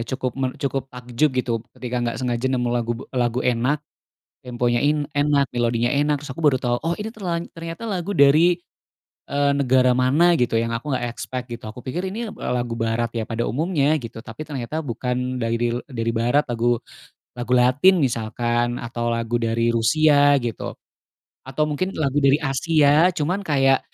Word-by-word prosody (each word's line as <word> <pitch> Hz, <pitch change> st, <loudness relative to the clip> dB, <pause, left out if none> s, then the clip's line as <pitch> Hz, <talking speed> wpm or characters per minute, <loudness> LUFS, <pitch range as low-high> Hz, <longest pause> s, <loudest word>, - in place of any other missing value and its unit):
cukup 130 Hz, -1 st, -2 dB
men 130 Hz, -1 st, +1 dB
cukup 135 Hz, -1 st, -3 dB
takjub 125 Hz, +3 st, -1 dB
gitu 125 Hz, -1 st, 0 dB, 0.2 s
ketika 125 Hz, -1 st, -4 dB, 0.2 s
gak -, -, -6 dB
sengaja 120 Hz, 0 st, -1 dB
nemu 125 Hz, -2 st, 0 dB
lagu 120 Hz, -1 st, 0 dB, 0.2 s
lagu 120 Hz, -1 st, 0 dB
enak, 125 Hz, +4 st, +1 dB, 0.7 s
temponya 120 Hz, -1 st, 0 dB
in 150 Hz, 0 st, +1 dB
enak, 145 Hz, -1 st, +2 dB
melodinya 120 Hz, 0 st, +1 dB
enak, 145 Hz, 0 st, +1 dB
terus 145 Hz, -, -8 dB
aku 165 Hz, -, -7 dB
baru 140 Hz, -4 st, +4 dB
tau, 120 Hz, -1 st, 0 dB
oh 165 Hz, +2 st, 0 dB
ini 210 Hz, -, -4 dB
terla 180 Hz, -5 st, -2 dB, 0.2 s
ternyata 165 Hz, +3 st, -7 dB
lagu 190 Hz, -2 st, -3 dB
dari, 155 Hz, +5 st, +5 dB, 0.7 s
eee, 140 Hz, 0 st, +2 dB
negara 130 Hz, -2 st, +3 dB
mana 150 Hz, +7 st, +4 dB
gitu 120 Hz, -2 st, +1 dB
yang 115 Hz, 0 st, -2 dB
aku 140 Hz, +4 st, -5 dB
gak 125 Hz, -1 st, -1 dB
expect 125 Hz, +1 st, -6 dB
gitu, 115 Hz, -, -11 dB
aku 125 Hz, -, -10 dB
pikir 135 Hz, +8 st, -4 dB
ini 230 Hz, +1 st, -4 dB
eb -, -, -9 dB
eee, -, -, -3 dB
lagu 120 Hz, -1 st, -2 dB
barat 115 Hz, +1 st, 0 dB
ya 110 Hz, -, -1 dB
pada 115 Hz, +1 st, -2 dB
umumnya 155 Hz, -, +1 dB
gitu, 115 Hz, -5 st, -7 dB
tapi 115 Hz, +6 st, -8 dB
ternyata 150 Hz, +2 st, -4 dB
bukan 125 Hz, 0 st, -2 dB
daril 115 Hz, +1 st, 0 dB
dari 115 Hz, -4 st, -2 dB
barat, 120 Hz, +6 st, +2 dB
lagu 120 Hz, 0 st, +1 dB, 0.6 s
lagu 120 Hz, +1 st, -1 dB
latin 140 Hz, +8 st, +4 dB
misalkan, 120 Hz, 0 st, -1 dB
atau 120 Hz, 0 st, -2 dB
lagu 115 Hz, +1 st, -1 dB
dari 115 Hz, 0 st, +1 dB
Rusia 145 Hz, +5 st, +4 dB
gitu. 115 Hz, -5 st, -4 dB, 0.7 s
Atau 145 Hz, +3 st, 0 dB
mungkin 155 Hz, +6 st, -2 dB
lagu 145 Hz, -2 st, +1 dB
dari 140 Hz, 0 st, +5 dB
Asia 150 Hz, +3 st, +4 dB
cuman 180 Hz, +2 st, -1 dB
kayak, 135 Hz, -7 st, +2 dB
130 Hz, 175 wpm, -22 LUFS, 120-150 Hz, 0.7 s, dari